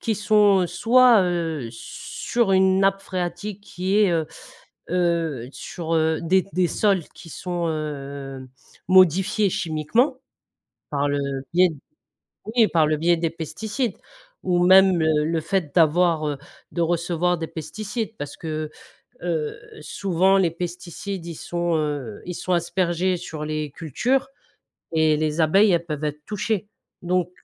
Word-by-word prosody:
qui 220 -3 -1
sont, 205 -2 +4
heu, - - 0
soit, 230 +5 +5
heu, 165 -7 -2
sur 205 - -3
une 190 0 +4
nappe 195 0 +2
phréatique 185 +2 -4
qui 190 0 -2
est, 210 -3 +4
heu 165 -2 0 0.6
heu, 170 -8 0
sur, 165 +1 -5
heu, 160 0 +1
des 185 +3 +3
des 180 -1 +3
sols 195 -5 +1
qui 170 - -13
sont, 175 0 -3
heu, 140 -3 -5 0.4
modifiés 190 +3 +4
chimiquement, 175 - 0 0.7
par 145 -1 0
le 145 0 0 0.3
biais 180 +1 +5 0.9
oui, 230 -2 +6
par 160 -3 +3
le 155 - +1
biais 170 +2 +3
des 165 -1 0
pesticides, 200 - -4 0.5
ou 175 -1 +2
même, 190 -1 +6
le 155 -2 +2
le 160 +1 0
fait 170 -3 -2
d'avoir, 165 -1 +3
heu, 145 -2 -3 0.3
de 170 - -3
recevoir 175 +1 0
des 160 - -3
pesticides. 215 - -5
Parce 145 0 -6
que, 155 -1 -4 0.5
heu, 160 -4 -2 0.2
souvent, 190 +3 +1
les 180 -4 +2
pesticides, 175 +2 -6
ils 170 - -6
sont, 175 +1 -2
heu, 145 -8 -3
ils 180 - -4
sont 180 - -2
aspergés 175 +1 0
sur 160 -3 -7
les 155 -1 -3
cultures, 240 - -1 0.6
et 160 -1 +3
les 155 +1 -1
abeilles, 195 +7 +5
elles 170 0 0
peuvent 150 -2 -4
être 150 0 -4
touchées, 210 -1 -2 0.3
donc 180 0 0
175 Hz, 145 wpm, -23 LUFS, 155-190 Hz, 0.9 s, oui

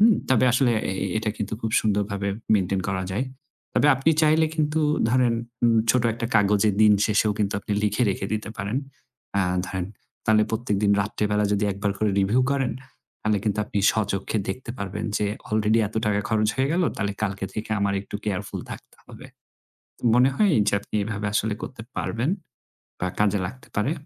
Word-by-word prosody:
হু? 215 - +7 0.3
তবে 130 -1 +4
আসলে 125 -1 +3 0.2
এ - - -4 0.2
এটা 110 -1 -1
কিন্তু 105 -1 -4
খুব 110 - -2
সুন্দরভাবে 100 -1 -1 0.3
মেইনটেইন 95 -1 +1
করা 95 -1 -1
যায়। 125 +7 0 0.5
তবে 145 - +4
আপনি 135 +5 +2
চাইলে 155 +1 +4
কিন্তু 155 0 +1 0.3
ধরেন 125 -2 +3 0.3
উ - - +7 0.2
ছোট 125 +1 +2
একটা 115 0 -3
কাগজের 105 -1 +3
দিন 105 -1 +7
শেষেও 105 0 +2
কিন্তু 100 -1 0
আপনি 105 - -4
লিখে 105 +3 +1
রেখে 95 - -3
দিতে 110 0 -3
পারেন। 100 +6 -1 0.6
অ্যা 100 -2 +2 0.2
ধরেন 95 -2 -3 0.4
তাহলে 110 -1 +4
প্রত্যেকদিন 105 -3 +1
রাত্রিবেলা 105 +1 0
যদি 105 +1 +1
একবার 100 +1 -1
করে 110 -1 +1
রিভিউ 105 +6 +2
করেন 135 -3 0 0.5
তাহলে 105 -1 +1
কিন্তু 105 0 0
আপনি 105 - -3
স্বচক্ষে 100 0 -1
দেখতে 120 +4 -4
পারবেন 105 +2 -4
যে 105 - 0 0.2
অলরেডি 110 +1 +2
এত - - -10
টাকা 105 0 +2
খরচ 110 -1 +2
হয়ে 135 +1 +1
গেল। 180 +1 +2
তাহলে 100 -1 -1
কালকে 100 -1 -2
থেকে 110 0 -5
আমার 100 0 +1
একটু 105 - -6
কেয়ারফুল 105 -1 -3
থাকতে - - -10
হবে। - - -11 0.9
মনে 125 +3 +5
হয় 205 +3 +3
এইযে 105 0 +2
আপনি - - -7
এভাবে 105 0 -3
আসলে 105 0 +1
করতে 125 -4 -7 0.2
পারবেন 120 +7 -1 0.7
বা 90 - -1
কাজে 105 -1 +2
লাগতে 130 +5 -12
পারে? 110 +8 +1
105 Hz, 175 wpm, -24 LUFS, 100-120 Hz, 0.9 s, হু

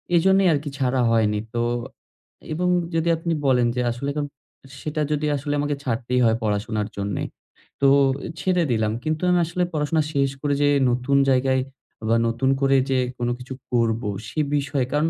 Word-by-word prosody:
এজন্যই 190 +3 +4
আরকি 145 0 -2
ছাড়া 130 -1 +1
হয়নি। 110 -2 +2
তো 120 - 0 0.9
এবং 180 +3 0 0.3
যদি 165 +1 +1
আপনি 165 +1 -2
বলেন 125 -2 +3
যে 125 - 0
আসলে 120 +4 -5
এখন 145 0 -2 0.6
সেটা 155 0 -3
যদি 150 0 0
আসলে 145 +1 -3
আমাকে 145 0 0
ছাড়তেই 125 0 -1
হয় 115 0 +3
পড়াশোনার 105 0 -1
জন্যে। 100 -1 -2 0.6
তো 140 - +5 0.5
ছেড়ে 180 -2 +1
দিলাম। 110 -2 +1
কিন্তু 155 0 -1
আমি 180 0 +4
আসলে 175 +2 -1
পড়াশোনা 155 +1 +1
শেষ 140 -1 +2
করে 145 -1 0
যে 145 - +4 0.2
নতুন 125 +3 +1
জায়গায় 130 0 +2 0.5
বা 115 - +4
নতুন 120 +3 0
করে 135 0 +4
যে 135 - +2 0.2
কোনো 120 0 -1
কিছু 125 +1 -8 0.2
করব, 115 -2 +1 0.3
সে 135 - -4 0.2
বিষয়ে, 140 -2 0
কারণ 150 +2 +2
135 Hz, 165 wpm, -23 LUFS, 120-150 Hz, 0.9 s, তো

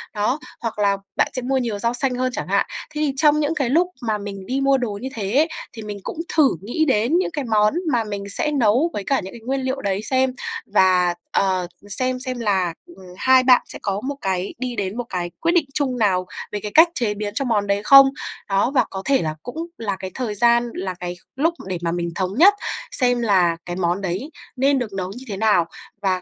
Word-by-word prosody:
Đó, 215 +7 0 0.2
hoặc 225 -2 -4
là 200 -1 +3 0.2
bạn - - +3
sẽ 255 - -2
mua 265 +2 0
nhiều 230 -5 -2
rau 235 +2 0
xanh 250 +1 0
hơn 255 +1 0
chẳng 150 - -4
hạn. 200 +1 +2 0.3
Thế 300 - -3
thì 290 -3 +1
trong 300 +1 +4
những 305 +2 0
cái 275 -5 0
lúc 335 +7 +3
mà 220 -3 -1
mình 200 -2 -7
đi 265 +6 -1
mua 275 0 +4
đồ 220 -6 -3
như 260 - -4
thế 230 +9 +2 0.3
thì 225 - -8
mình 210 -1 -6
cũng - - -6 0.2
thử 300 -4 +6
nghĩ 240 +11 0
đến 260 +3 +2
những 370 - 0
cái 295 -3 -3
món 210 -2 +3 0.2
mà 240 -3 +2
mình 205 -2 -5
sẽ 300 - +1
nấu 260 +3 +3
với 205 - -3
cả 275 +6 +1
những 190 - -8
cái 235 - -11
nguyên 270 +2 -1
liệu 260 +1 -2
đấy 200 -2 -1
xem 260 +2 +1 0.4
và, 185 -3 +4 0.2
ờ, 185 -2 +1 0.2
xem 255 +5 -1
xem 255 -1 -4
là, 190 -6 +1
ừm, 345 - -16 0.2
hai 260 +2 +5
bạn 255 -1 +6
sẽ - - -9
có 200 0 -2
một 280 +4 -3
cái 190 0 -2
đi 250 -1 -3
đến 200 0 -3
một 245 - -2
cái 175 -2 -3
quyết 335 +1 +2
định 345 -4 +3
chung 270 -4 -1
nào 190 -5 +2 0.3
về 210 - -2
cái 210 0 -5
cách 325 +2 +8
chế 225 -4 0
biến 205 0 -4
cho 270 +5 -1
món 210 -4 +1
đấy 200 0 +1
không? 275 +3 +9 0.4
Đó 195 +6 +2
và 265 -3 +3
có 190 - -5
thể 275 -1 +3
là 155 -1 -2
cũng 245 +4 -7 0.2
là 205 -3 -2
cái 190 - -6
thời 235 -5 -3
gian, 235 +2 +3
là 185 0 -3
cái 180 0 -4 0.2
lúc 320 +5 +2
để 185 -2 -2
mà 170 -1 -1
mình 170 0 -2
thống 185 -1 -1
nhất 380 +7 +8 0.4
xem 245 -2 +2
là 185 -7 +3
cái 175 - -4
món 175 +1 0
đấy 190 - -3 0.3
nên 275 +1 +2
được 220 -5 -4
nấu 185 -1 -3
như 260 - -9
thế 200 -3 -4
nào 210 -5 +3 0.4
và, 185 -2 0
225 Hz, 240 wpm, -22 LUFS, 195-265 Hz, 0.4 s, không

